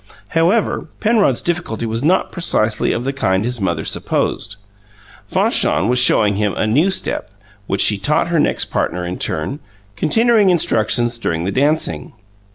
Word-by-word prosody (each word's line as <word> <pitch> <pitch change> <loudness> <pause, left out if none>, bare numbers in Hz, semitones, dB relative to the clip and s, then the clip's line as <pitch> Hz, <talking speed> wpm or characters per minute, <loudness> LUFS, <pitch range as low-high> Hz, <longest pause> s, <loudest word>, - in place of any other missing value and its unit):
However, 175 +7 0
Penrod's 210 - +2
difficulty 170 -10 -3
was 115 +1 -2
not 175 +6 +1
precisely 110 - 0
of 120 - -2
the 135 +2 -2
kind 95 -6 0
his 125 -2 -3
mother 85 -4 -2
supposed. - - -2 0.7
Fanchon 100 - +2
was 125 0 +2
showing 105 -5 +4
him 105 -1 -1
a - - -1
new 145 - +2
step, 190 - -2 0.4
which 95 - 0
she 105 -2 +4
taught 150 +10 0
her 170 -2 +1
next - - 0
partner 90 +1 -2
in 90 +1 -5
turn, 80 - -2 0.4
continuing 225 - +3
instructions 120 -7 +1
during 85 -7 -2
the 95 - -2
dancing. 135 - -1
120 Hz, 155 wpm, -17 LUFS, 100-165 Hz, 0.7 s, showing